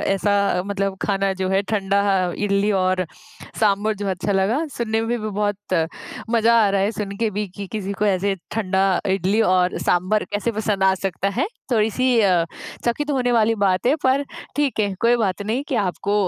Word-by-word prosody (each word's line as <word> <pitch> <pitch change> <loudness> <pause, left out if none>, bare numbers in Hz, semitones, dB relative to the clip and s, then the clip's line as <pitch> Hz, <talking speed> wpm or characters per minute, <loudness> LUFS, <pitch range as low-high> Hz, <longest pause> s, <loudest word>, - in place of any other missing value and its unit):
ऐसा 200 +1 +1 0.3
मतलब 195 -1 -2
खाना 195 -1 0
जो 185 - 0
है 190 +1 +2
ठंडा 200 -2 +1 0.5
इडली 200 +1 +1
और 185 -1 +1 0.6
साँभर 210 +1 +2
जो 200 0 -4
अच्छा 190 +2 -1
लगा, 210 +11 +1
सुनने 225 -2 0
में 225 - -3
भी 240 0 0
बहुत 205 -1 -2 0.6
मज़ा 230 0 +4
आ - - +2
रहा 195 - +1
है 200 +2 +1
सुन 200 -2 -5
के 225 -2 +1
भी 210 +1 -3
कि 200 -1 -5
किसी 200 -2 -3
को 210 +2 -1
ऐसे 195 0 +1 0.2
ठंडा 190 -3 +1 0.3
इडली 195 +3 +1
और 180 0 +2
साँभर 185 +4 +1
कैसे 210 +3 -1
पसंद 210 -2 -1
आ 190 - +5
सकता 195 0 -2
है? 270 - +1 0.3
थोड़ी-सी 225 +3 +2
अ, 180 -4 +3 0.4
चकित 290 +5 -1
होने 250 -3 +1
वाली 225 -1 +3
बात 190 +1 +2
है 265 - +4
पर 265 +2 +3 0.3
ठीक 285 -6 +1
है, 205 -2 0
कोई 235 +1 +4
बात 205 -3 -1
नहीं 225 +6 -1
कि 270 - -2
आपको 190 +2 -2
205 Hz, 190 wpm, -21 LUFS, 195-225 Hz, 0.6 s, आ